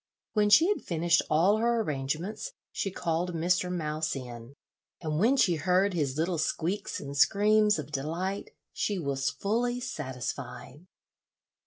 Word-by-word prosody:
When 210 -1 +3
she 320 +11 +7
had 415 - 0
finished 170 0 +2
all 175 +7 +4
her 235 +1 +2
arrangements 155 - -3 0.2
she 195 - -2
called 175 -1 -2
Mr. 180 +2 +1
Mouse 155 -3 -2
in, 120 0 -8 0.4
and 155 -2 -2
when 245 +8 +4
she 180 -9 +3
heard 185 +5 +2
his 145 -5 -1
little 165 +1 0
squeaks 180 +6 -2
and 140 0 -7
screams 210 +6 +4
of 150 -1 -6
delight, 165 +8 -3 0.2
she 205 - -1
was 140 -4 -1
fully 230 - -1
satisfied. 130 - -6
170 Hz, 140 wpm, -29 LUFS, 145-200 Hz, 0.4 s, she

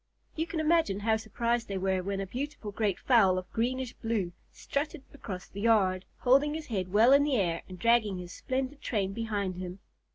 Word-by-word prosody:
You 320 +1 -1
can 330 - -3
imagine 315 - +2
how 220 +1 +3
surprised 235 +2 -1
they 195 - -3
were 190 0 0
when 195 +1 -3
a 195 - -2
beautiful 250 0 -5
great 205 -2 0
fowl 200 -8 +4
of 185 0 -6
greenish 250 +2 -1
blue 220 -6 -2 0.2
strutted 290 +1 -3
across 195 -9 -7
the 200 - -8
yard, 195 -5 +3 0.2
holding 275 +4 +4
his 315 -1 -5
head 190 -7 -3
well 225 +6 +6
in 280 +1 +6
the 290 -2 +1
air 175 -6 0
and 185 - -8
dragging 220 -2 +3
his 180 0 -8
splendid 265 +2 -3
train 195 -4 -1
behind 205 -4 -2
him. 180 0 -6
220 Hz, 195 wpm, -30 LUFS, 190-260 Hz, 0.2 s, well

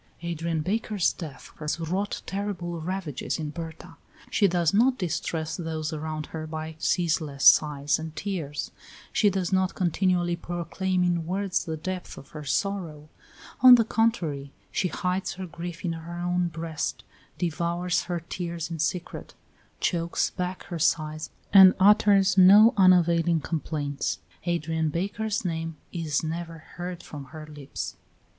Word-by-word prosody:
Adrian 165 -1 -2
Baker's 205 -1 0
death 155 -6 -9
has 150 +2 -2
wrought 185 +5 -2
terrible 180 -4 -4
ravages 170 -5 -3
in 155 -2 -4
Berta. 165 +1 -8 0.3
She 205 - +4
does 175 -2 +1
not 250 +5 +4
distress 160 -2 -2
those 160 -3 -3
around 155 0 -4
her 155 -1 -4
by 155 0 -5
ceaseless 155 -6 0
sighs 145 -1 +5
and 160 0 -7
tears; 160 -8 -4 0.4
she 210 - +4
does 190 -1 -1
not 185 0 +1
continually 175 -1 +1
proclaim 175 +2 -2
in 170 -2 0
words 195 +1 -1
the 160 -1 -3
depth 185 +3 -5
of 140 - -12
her 150 -1 -8
sorrow; 155 -2 -2 0.5
on 255 -1 +10
the 230 -2 +3
contrary, 165 -13 0 0.2
she 185 - 0
hides 180 +1 -2
her 185 +1 -6
grief 170 0 -7
in 170 - 0
her 165 +1 -7
own 175 0 0
breast, 165 -1 -4 0.3
devours 175 +1 -1
her 175 -1 -3
tears 170 -1 -5
in 165 - -4
secret, 175 +3 -3 0.4
chokes 170 -1 0
back 180 0 -4
her 170 - -6
sighs 155 -1 0 0.2
and 190 -2 +9
utters 200 -1 +5
no 205 +6 +8
unavailing 175 -3 +4
complaints; 145 -3 -2 0.3
Adrian 160 -2 0
Baker's 200 +6 -2
name 165 -1 -3 0.2
is 160 -4 -1
never 165 +1 -4 0.2
heard 175 0 -5
from 145 -2 -8
her 155 +2 -10
lips. 145 -2 -7
170 Hz, 140 wpm, -26 LUFS, 160-185 Hz, 0.5 s, on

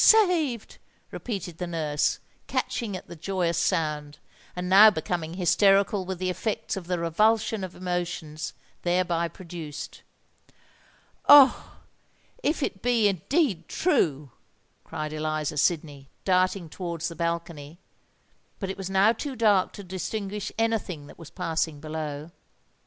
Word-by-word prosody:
saved!" 345 - +4 0.3
repeated 185 -8 -5
the 180 - -3
nurse, 155 -3 0 0.3
catching 210 -6 -2
at - - -12
the 170 - -10
joyous 175 0 -1
sound, 150 -5 -1 0.4
and 180 0 -3
now 200 +4 +9
becoming 165 -2 -3
hysterical 195 +2 +3
with 190 0 -4
the 185 +1 -1
effects 215 +4 -3
of 185 -3 -7
the 180 -1 0
revulsion 215 +5 +2
of 185 -1 -6
emotions 175 -4 -4 0.3
thereby 175 -1 +1
produced. 165 -3 -8 1.3
"Oh! 285 -2 +7 0.7
if 300 -5 0
it 195 -7 -3
be 235 -3 +3
indeed 200 - 0
true!" 150 - +1 0.5
cried 155 0 -5
Eliza 155 -1 -2
Sydney, 145 -3 0 0.2
darting 185 -1 +2
towards 170 0 -4
the 170 - -7
balcony; 170 -2 -4 0.8
but 195 -2 -3
it - - -8
was 190 -1 -5
now 195 +3 +4
too 270 +3 -5
dark 210 -5 +3
to 200 - -9
distinguish 195 +2 -4
any 225 0 +2
thing 160 -8 -8
that 145 - -14
was 165 -2 -10
passing 160 -4 -2
below. 155 0 -5
180 Hz, 130 wpm, -26 LUFS, 160-200 Hz, 1.3 s, now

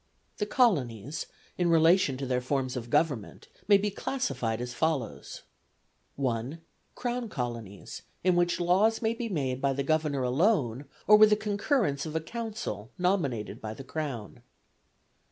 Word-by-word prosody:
The 210 - -1
colonies, 145 - +1 0.3
in 175 -1 +2
relation 165 -3 +4
to 135 - -4
their 125 -1 0
forms 130 0 -1
of 120 -2 -5
government, 140 -7 0 0.2
may 205 -1 +7
be 205 +1 -1
classified 135 - -2
as 125 0 -4
follows: 145 -6 -2 0.7
I. 130 +2 -2 0.4
Crown 245 -1 -3
colonies, 115 - -5 0.2
in 185 0 +3
which 175 0 +2
laws 195 +7 +3
may 220 +1 +2
be 230 0 -4
made 135 -8 -2
by 140 -1 +2
the 140 +1 -2
Governor 150 -2 +1
alone, 135 - +1 0.2
or 210 - +8
with 215 0 +8
the 210 - +5
concurrence 205 - 0
of 155 - -6
a - - +2
Council 215 - -5
nominated 165 - -1
by 110 0 -5
the 135 - -9
Crown. 135 -7 -5
150 Hz, 150 wpm, -29 LUFS, 125-200 Hz, 0.7 s, or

